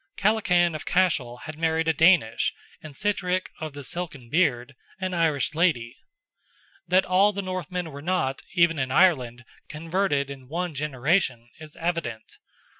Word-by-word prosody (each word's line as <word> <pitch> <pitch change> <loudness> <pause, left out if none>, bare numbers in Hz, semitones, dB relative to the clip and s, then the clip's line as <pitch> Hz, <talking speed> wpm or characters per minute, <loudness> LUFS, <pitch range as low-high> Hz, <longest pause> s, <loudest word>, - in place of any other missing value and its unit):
Kellachan 180 -5 +2
of 155 - -5
Cashel 140 -10 0
had 155 -1 -8
married 160 0 +1
a 160 - +3
Danish, 160 -10 +3 0.3
and 155 -3 -11
Sitrick 185 0 -1
"of 155 -2 -5
the 145 0 -8
Silken 140 -7 -6
beard," 140 -6 +1 0.3
an 185 -1 -3
Irish 160 -4 +1
lady. 150 -8 +1 0.9
That 185 +1 +3
all 190 +3 +4
the 200 -1 -4
Northmen 180 -2 -4
were 140 +1 -9
not, 155 -5 -1
even 170 -3 +3
in 130 -1 -1
Ireland, 130 -7 +2 0.2
converted 155 -3 -1
in 135 -2 -10
one 175 +3 -3
generation, 135 -3 0
is 155 -1 -12
evident. 165 -10 -4
160 Hz, 145 wpm, -25 LUFS, 135-180 Hz, 0.9 s, all